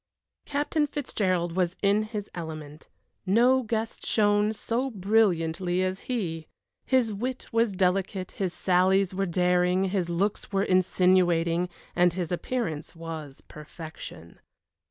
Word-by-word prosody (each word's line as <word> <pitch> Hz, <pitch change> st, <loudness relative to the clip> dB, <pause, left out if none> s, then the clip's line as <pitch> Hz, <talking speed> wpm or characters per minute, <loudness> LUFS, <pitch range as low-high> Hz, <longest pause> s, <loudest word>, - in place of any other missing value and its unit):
Captain 295 Hz, +1 st, 0 dB
Fitzgerald 185 Hz, -, -1 dB
was 180 Hz, -1 st, +1 dB
in 200 Hz, +1 st, +4 dB
his 215 Hz, -1 st, -5 dB
element. 155 Hz, -3 st, -8 dB, 0.4 s
No 245 Hz, +6 st, +4 dB
guest 225 Hz, -1 st, -3 dB
shone 205 Hz, 0 st, +2 dB
so 235 Hz, +4 st, -2 dB
brilliantly 185 Hz, -4 st, +1 dB
as 185 Hz, +1 st, -2 dB
he. 165 Hz, -10 st, -2 dB, 0.4 s
His 250 Hz, -4 st, +2 dB
wit 250 Hz, +5 st, -4 dB
was 230 Hz, -2 st, +2 dB
delicate, 185 Hz, 0 st, 0 dB
his 190 Hz, -3 st, -2 dB
sallies 190 Hz, +1 st, +2 dB
were 195 Hz, +1 st, -1 dB
daring, 180 Hz, +1 st, +2 dB
his 185 Hz, -4 st, 0 dB
looks 195 Hz, +5 st, -1 dB
were 195 Hz, -1 st, +1 dB
insinuating, 180 Hz, -2 st, +3 dB, 0.3 s
and 175 Hz, -1 st, +4 dB
his 175 Hz, -2 st, -3 dB
appearance 175 Hz, -5 st, -3 dB
was 160 Hz, -4 st, -7 dB
perfection. 150 Hz, -, -10 dB
185 Hz, 120 wpm, -27 LUFS, 175-215 Hz, 0.4 s, in